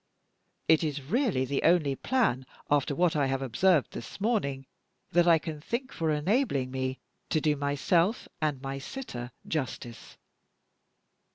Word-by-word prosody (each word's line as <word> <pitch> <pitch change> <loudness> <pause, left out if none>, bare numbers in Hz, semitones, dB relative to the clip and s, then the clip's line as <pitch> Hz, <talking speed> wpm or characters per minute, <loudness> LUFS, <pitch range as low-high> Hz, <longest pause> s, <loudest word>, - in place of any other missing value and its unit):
It 160 0 +5
is 150 -2 -1
really 195 - +1
the 140 +1 -1
only 160 -5 +3
plan, 135 - 0 0.2
after 145 -1 +2
what 175 0 +2
I 145 -2 +2
have 135 0 -1
observed 150 +5 +3
this 115 - -8
morning, 195 - 0 0.5
that 175 +1 +4
I 165 -1 +7
can 155 -1 -6
think 250 - -3
of - - -12
for 165 -2 0
enabling 150 - +1
me 130 0 -2 0.3
to 155 - +2
do 150 -1 +2
myself 155 - +1
and 150 -3 0
my 135 0 -4
sitter 130 - -6 0.2
justice." 130 -5 -4
150 Hz, 150 wpm, -29 LUFS, 135-175 Hz, 0.5 s, I